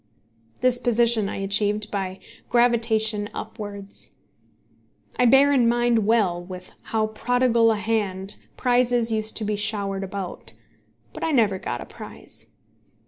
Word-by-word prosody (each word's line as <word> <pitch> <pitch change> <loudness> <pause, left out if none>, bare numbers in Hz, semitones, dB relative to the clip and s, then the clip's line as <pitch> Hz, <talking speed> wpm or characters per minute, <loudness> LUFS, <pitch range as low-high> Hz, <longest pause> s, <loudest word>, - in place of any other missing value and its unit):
This 250 -1 +2
position 235 -3 +2
I - - -5
achieved 205 +2 +1
by 190 -2 -3 0.3
gravitation 225 -3 +2
upwards. 205 -2 -6 1.0
I 250 - +3
bear 270 +4 +6
in 250 -4 +4
mind 240 -3 +2
well 195 -6 +2
with 180 0 -10
how 220 -1 0
prodigal 235 +1 +2
a - - +1
hand 205 -3 -1 0.2
prizes 245 -2 +2
used 220 0 0
to 220 - -3
be 210 0 -1
showered 200 -2 -2
about; 185 - -6 0.6
but - - -7
I - - +1
never 215 -8 +2
got - - -4
a - - -7
prize. - - -9
220 Hz, 135 wpm, -24 LUFS, 200-235 Hz, 1.0 s, bear